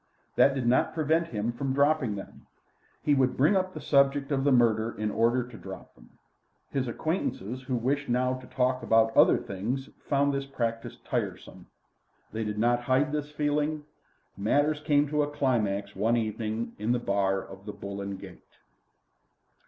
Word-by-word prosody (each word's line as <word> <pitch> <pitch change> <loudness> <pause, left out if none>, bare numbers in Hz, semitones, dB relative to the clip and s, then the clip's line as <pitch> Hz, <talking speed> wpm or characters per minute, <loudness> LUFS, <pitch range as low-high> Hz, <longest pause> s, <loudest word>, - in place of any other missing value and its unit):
That 135 - +5
did 130 -3 -2
not 120 +5 +2
prevent 160 +1 +1
him 110 -3 -2
from 130 +3 -2
dropping 140 -6 +2
them. 100 - -10 0.6
He 150 - +3
would 130 -2 +2
bring 150 +10 +4
up 185 0 0
the - - -5
subject 140 0 +2
of 135 -1 +1
the 140 - +3
murder 115 -2 +3
in 105 0 -1
order 120 +3 +1
to 120 -3 -11
drop - - -10
them. - - -19 0.6
His 135 -2 -1
acquaintances 130 - -3
who 130 0 -3
wished 135 +4 -1
now 125 +1 +1
to 130 0 -8
talk 130 0 0
about 115 0 +3
other - - +6
things 115 +8 -4 0.2
found 140 0 +2
this 140 0 -3
practice 115 -4 -3
tiresome. - - -4 0.7
They 110 0 -2
did 105 -1 -3
not 120 +2 +2
hide 130 +4 +1
this 150 -1 -2
feeling. 150 +1 -1 0.5
Matters 145 +9 +1
came 150 -1 +2
to 150 0 +1
a 145 - 0
climax 105 -8 -1
one 110 +5 +2
evening 110 0 -3
in 110 +3 +1
the - - +2
bar 100 -4 0
of 95 +1 -11
the - - -3
"Bull 100 0 -6
and 100 0 -5
Gate." - - -14
125 Hz, 175 wpm, -28 LUFS, 110-145 Hz, 0.7 s, other